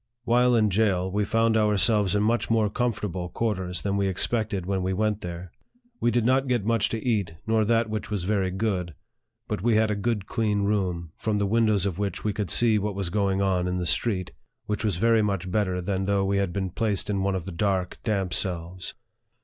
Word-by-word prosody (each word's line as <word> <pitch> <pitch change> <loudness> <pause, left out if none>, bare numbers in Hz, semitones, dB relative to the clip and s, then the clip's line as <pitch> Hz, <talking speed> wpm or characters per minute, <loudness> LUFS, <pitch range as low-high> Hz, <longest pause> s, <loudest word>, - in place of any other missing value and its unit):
While 125 +1 +3
in 110 -3 +3
jail, 95 -3 +1
we 105 +2 0
found 115 +1 +2
ourselves 105 -1 +3
in 105 - +2
much 115 +2 +1
more 110 -2 +2
comfortable 105 -7 -2
quarters 95 -4 -2
than 100 -1 0
we 100 -1 +1
expected 100 0 0
when 95 0 -1
we 95 +1 -1
went 105 +1 0
there. 85 0 -7 0.5
We 120 - +2
did 120 -1 +1
not 130 +2 +2
get 120 -5 0
much 115 -1 +2
to 115 +1 -4
eat, 100 -9 0
nor 110 -1 +2
that 115 +1 +2
which 110 0 -4
was 105 -4 -2
very 95 -1 0
good; 95 -4 -2 0.5
but - - -3
we 115 +1 +2
had 110 0 +3
a - - 0
good 105 -1 -1
clean 105 -3 0
room, 90 -5 -1
from 110 -2 -1
the 100 - +1
windows 110 -2 +2
of 95 -2 -2
which 100 -3 -3
we 105 - 0
could 105 -2 -3
see 115 -3 +4
what 105 0 -3
was 95 -3 -3
going 100 -1 +1
on 90 -2 +1
in 90 0 -1
the 90 - -2
street, 90 +3 0 0.3
which 105 +1 -2
was 105 -6 0
very 115 +3 +3
much 100 -3 -2
better 95 -3 0
than 95 +1 -2
though 100 0 +1
we 100 +1 +1
had 100 -2 0
been 95 -1 -3
placed 105 -1 -1
in 100 -2 -1
one 95 0 0
of 90 -3 -4
the 95 - -6
dark, 95 +1 -1
damp 95 -5 -1
cells. 90 0 -2
100 Hz, 220 wpm, -26 LUFS, 95-110 Hz, 0.5 s, see